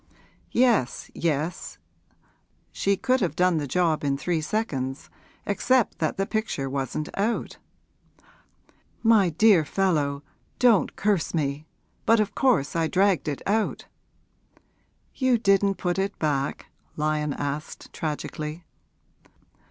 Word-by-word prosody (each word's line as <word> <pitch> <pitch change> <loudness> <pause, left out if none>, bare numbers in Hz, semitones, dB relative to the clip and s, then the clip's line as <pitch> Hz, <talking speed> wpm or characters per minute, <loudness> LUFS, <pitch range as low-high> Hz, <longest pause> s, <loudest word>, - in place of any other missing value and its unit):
'Yes, 235 - +1
yes; 160 +1 -2 0.9
she 200 0 0
could 255 +2 +1
have 170 -6 -1
done 180 -1 +3
the 145 -2 -2
job 165 0 +1
in 140 -1 0
three 165 +2 -1
seconds, 145 - -3 0.3
except 245 +4 +1
that 155 - -1
the 195 - 0
picture 215 -11 -2
wasn't 135 +2 -3
out.' 215 +4 -2 1.4
'My 220 -5 +5
dear 185 +1 +5
fellow, 145 -5 0 0.3
don't 240 -5 +3
curse 200 -5 0
me! 145 0 -2 0.4
but 230 0 +5
of 215 0 0
course 240 - +2
I 165 -1 +1
dragged 190 0 +2
it 145 -2 -3
out.' 215 +2 0 1.3
'You 260 -3 +2
didn't 195 -2 +3
put 180 0 -2
it 195 +1 -2
back?' 145 -3 -1 0.3
Lyon 150 -1 -1
asked 145 +2 -5
tragically. 155 +1 -4
175 Hz, 115 wpm, -25 LUFS, 150-205 Hz, 1.4 s, My